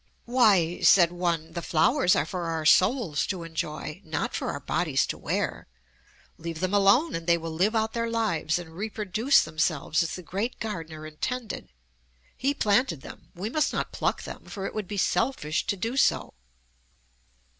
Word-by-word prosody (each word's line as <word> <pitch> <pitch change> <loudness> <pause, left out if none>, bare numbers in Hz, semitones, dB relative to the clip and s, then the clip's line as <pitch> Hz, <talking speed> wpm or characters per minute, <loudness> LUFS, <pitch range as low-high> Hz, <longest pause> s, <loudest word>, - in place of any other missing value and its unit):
"Why," 205 -9 +3
said 175 -3 +6
one, 170 -2 -2
"the 170 - -3
flowers 175 - +3
are 145 - +1
for 180 0 -4
our 165 -1 -2
souls 185 - +3
to 185 -4 -3
enjoy; 160 +1 -5
not 155 -3 -3
for - - -2
our - - -3
bodies - - 0
to - - -4
wear. - - -3 0.7
Leave 165 -1 -5
them 185 +2 -1
alone 205 +11 +4
and 165 0 -4
they 170 0 +5
will 165 0 -5
live 190 +8 +1
out 220 0 0
their 230 0 -1
lives 215 -9 0
and 175 -2 -8
reproduce 215 +5 +2
themselves 155 0 0
as 165 -1 -2
the 180 - -8
Great 200 +8 -3
Gardener 165 -8 -5
intended. 220 +10 -4 0.7
He 280 +2 0
planted 205 - +2
them: - - -12
we 200 +6 -4
must 310 +2 +1
not - - -2
pluck - - -1
them, - - -9
for 195 -2 -6
it - - -4
would 215 -3 -4
be 205 - -5
selfish 195 - 0
to 200 - 0
do 225 +7 -3
so." 275 - +2
180 Hz, 175 wpm, -27 LUFS, 165-220 Hz, 0.7 s, said